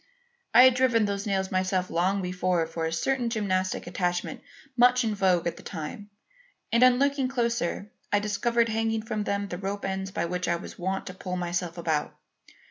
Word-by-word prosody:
I 245 Hz, +2 st, +8 dB
had 260 Hz, 0 st, +7 dB
driven 250 Hz, -3 st, +3 dB
those 200 Hz, 0 st, -3 dB
nails 190 Hz, -1 st, -1 dB
myself 185 Hz, -1 st, 0 dB
long 185 Hz, +4 st, +1 dB
before 180 Hz, -2 st, 0 dB
for 165 Hz, 0 st, -3 dB
a -, -, -3 dB
certain 240 Hz, +9 st, 0 dB
gymnastic 185 Hz, -4 st, -1 dB
attachment 175 Hz, 0 st, -2 dB, 0.3 s
much 250 Hz, +1 st, +5 dB
in 220 Hz, -2 st, 0 dB
vogue 185 Hz, -4 st, +2 dB
at 170 Hz, -, -2 dB
the -, -, -11 dB
time, 165 Hz, +7 st, -7 dB, 0.6 s
and 235 Hz, +2 st, +3 dB
on 250 Hz, 0 st, +6 dB
looking 280 Hz, -1 st, +1 dB
closer, 235 Hz, -6 st, -1 dB, 0.2 s
I 205 Hz, -, +4 dB
discovered 230 Hz, +3 st, +1 dB
hanging 225 Hz, 0 st, 0 dB
from 215 Hz, -2 st, -3 dB
them 200 Hz, 0 st, -1 dB
the 175 Hz, -, -5 dB
rope 200 Hz, +1 st, -4 dB
ends 190 Hz, 0 st, -3 dB
by 190 Hz, -, -2 dB
which 180 Hz, +1 st, -3 dB
I 170 Hz, -, +2 dB
was 170 Hz, -, -9 dB
wont 190 Hz, +2 st, -2 dB
to 185 Hz, -, -7 dB
pull 180 Hz, -1 st, -5 dB
myself 175 Hz, -1 st, -3 dB
about. 160 Hz, -3 st, -1 dB
195 Hz, 190 wpm, -27 LUFS, 180-230 Hz, 0.6 s, I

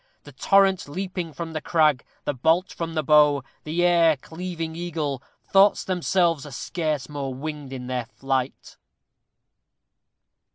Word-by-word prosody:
The -, -, -12 dB
torrent 195 Hz, -3 st, +3 dB
leaping 180 Hz, 0 st, -4 dB
from 165 Hz, +3 st, -6 dB
the 155 Hz, -, -3 dB
crag 155 Hz, -6 st, +2 dB, 0.2 s
the 145 Hz, -, 0 dB
bolt 160 Hz, +8 st, +1 dB
from 165 Hz, -1 st, -5 dB
the 155 Hz, -, 0 dB
bow 150 Hz, -2 st, +5 dB, 0.2 s
the 165 Hz, +3 st, 0 dB
air 170 Hz, -3 st, +4 dB
cleaving 165 Hz, +2 st, -6 dB
eagle 155 Hz, -6 st, -3 dB, 0.3 s
thoughts 195 Hz, +1 st, +4 dB
themselves 175 Hz, -4 st, +1 dB
are 150 Hz, -, -9 dB
scarce 155 Hz, +2 st, -3 dB
more 140 Hz, -3 st, -5 dB
winged 145 Hz, 0 st, -6 dB
in 130 Hz, -2 st, -6 dB
their 125 Hz, -2 st, -3 dB
flight! 135 Hz, 0 st, -3 dB
160 Hz, 135 wpm, -24 LUFS, 140-175 Hz, 0.3 s, bow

